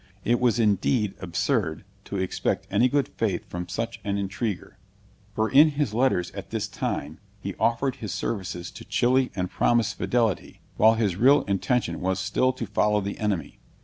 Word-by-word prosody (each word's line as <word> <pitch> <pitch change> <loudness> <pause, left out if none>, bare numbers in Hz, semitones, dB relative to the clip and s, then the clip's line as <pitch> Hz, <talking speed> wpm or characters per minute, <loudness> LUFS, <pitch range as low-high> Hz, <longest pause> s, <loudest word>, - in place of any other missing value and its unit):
It 120 +1 +2
was 120 -2 +2
indeed 105 0 +2
absurd 90 - -1 0.2
to 100 - -4
expect 95 -1 -1
any 125 - +4
good 140 +1 +1
faith 100 -6 -2
from 90 0 -6
such 115 -1 -4
an 100 -1 -1
intriguer; 100 +1 -4 0.6
for 110 - +1
in 145 +6 +7
his 145 -6 -1
letters 115 -7 +1
at - - -8
this - - -2
time, 75 +3 -4 0.2
he 100 0 -5
offered 125 +3 +1
his 105 - -5
services 95 -5 -4
to - - -10
Chili 130 +1 +2
and 90 -1 -2
promised 120 -3 +1
fidelity, 115 -5 0
while 110 +1 +5
his 105 -6 0
real 135 +5 +5
intention 100 -2 -1
was 95 0 0
still 130 +6 +1
to 125 -2 -5
follow 105 0 +2
the 100 0 -5
enemy. 105 -5 -2
110 Hz, 170 wpm, -25 LUFS, 95-120 Hz, 0.6 s, in